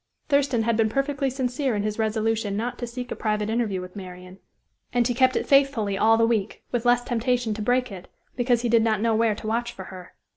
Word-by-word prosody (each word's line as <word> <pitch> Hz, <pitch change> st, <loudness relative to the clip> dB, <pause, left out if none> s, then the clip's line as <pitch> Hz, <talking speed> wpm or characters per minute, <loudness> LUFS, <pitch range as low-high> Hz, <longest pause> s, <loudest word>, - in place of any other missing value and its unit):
Thurston 280 Hz, -5 st, +2 dB
had 230 Hz, 0 st, +1 dB
been 220 Hz, -1 st, +2 dB
perfectly 275 Hz, +2 st, -1 dB
sincere 260 Hz, -1 st, -1 dB
in 205 Hz, -, -1 dB
his 210 Hz, +1 st, -3 dB
resolution 220 Hz, -1 st, 0 dB
not 240 Hz, +3 st, -3 dB
to 240 Hz, -, -4 dB
seek 245 Hz, +1 st, -7 dB
a -, -, -2 dB
private 210 Hz, -1 st, -1 dB
interview 220 Hz, -5 st, -1 dB
with 180 Hz, +1 st, -10 dB
Marian; 185 Hz, -1 st, -10 dB, 0.5 s
and 240 Hz, -1 st, +2 dB
he 245 Hz, -, 0 dB
kept 255 Hz, +1 st, +3 dB
it -, -, 0 dB
faithfully 275 Hz, -8 st, +3 dB
all 225 Hz, +3 st, +4 dB
the 230 Hz, -, +4 dB
week, 220 Hz, -3 st, -1 dB
with 245 Hz, 0 st, -1 dB
less 245 Hz, 0 st, +4 dB
temptation 240 Hz, -1 st, 0 dB
to 215 Hz, -, -5 dB
break 250 Hz, +2 st, +1 dB
it, 185 Hz, -2 st, -9 dB, 0.3 s
because 245 Hz, -1 st, +1 dB
he -, -, +1 dB
did 230 Hz, 0 st, +4 dB
not 220 Hz, -2 st, +1 dB
know 230 Hz, +1 st, +1 dB
where 220 Hz, -1 st, +2 dB
to 215 Hz, -, -10 dB
watch 235 Hz, +2 st, -1 dB
for 190 Hz, -, -9 dB
her. 180 Hz, -1 st, -11 dB
230 Hz, 230 wpm, -24 LUFS, 210-245 Hz, 0.5 s, all